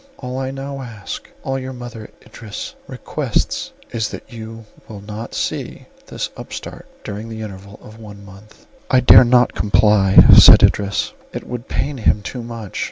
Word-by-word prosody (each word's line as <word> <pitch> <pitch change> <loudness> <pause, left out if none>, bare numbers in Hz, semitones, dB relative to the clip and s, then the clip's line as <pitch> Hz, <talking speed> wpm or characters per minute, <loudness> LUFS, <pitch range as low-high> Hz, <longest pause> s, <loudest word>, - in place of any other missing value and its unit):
All 125 0 -6
I 130 0 -3
now 135 +1 -6
ask, 115 -5 -8
all 135 0 -2
your 130 0 -7
mother, 120 -3 -9 0.2
Idris, 110 -4 -8
requests - - -3 0.2
is, 110 -2 -2
that - - -10
you 115 0 -9 0.2
will 105 -3 -10
not 105 +3 -8
see - - -4 0.2
this - - -5
upstart - - -9 0.2
during 105 +3 -7
the 110 -1 -7
interval 100 -1 -10
of 110 +1 -14
one 100 -2 -12
month." 100 +2 -17 0.2
"I 125 - +4
dare 125 - +8
not 125 0 +3
comply," 100 -1 +2 0.2
said - - +9
Idris, 100 0 +1 0.2
"it - - -6
would 120 -1 -7
pain 145 -2 -3
him 105 -1 +1
too 125 +6 -6
much. 115 -4 -8
110 Hz, 165 wpm, -19 LUFS, 105-125 Hz, 0.2 s, said